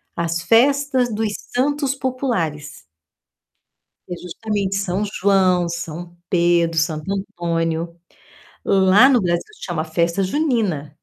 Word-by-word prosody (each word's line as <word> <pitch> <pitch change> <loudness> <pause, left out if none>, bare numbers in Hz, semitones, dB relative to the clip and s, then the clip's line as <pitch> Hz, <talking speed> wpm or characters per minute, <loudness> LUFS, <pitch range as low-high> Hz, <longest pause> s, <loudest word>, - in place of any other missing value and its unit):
as 170 0 -2
festas 255 +4 +2
dos 215 0 -1 0.2
santos 280 +1 +1
populares. 185 - -3 1.3
Que - - -5
é 175 - -6
justamente 195 +2 -3
São 195 0 -1
João, 190 -3 +2
São 170 +1 -6
Pedro, 170 -2 +2
Santo 155 +2 -1
Antônio. 170 -3 -2 0.7
Lá 195 +6 +5
no 255 -4 +4
Brasil 175 -2 0 0.2
chama 165 -3 -3
Festa 170 +3 0
Junina. 205 - 0
185 Hz, 110 wpm, -20 LUFS, 170-225 Hz, 1.3 s, Lá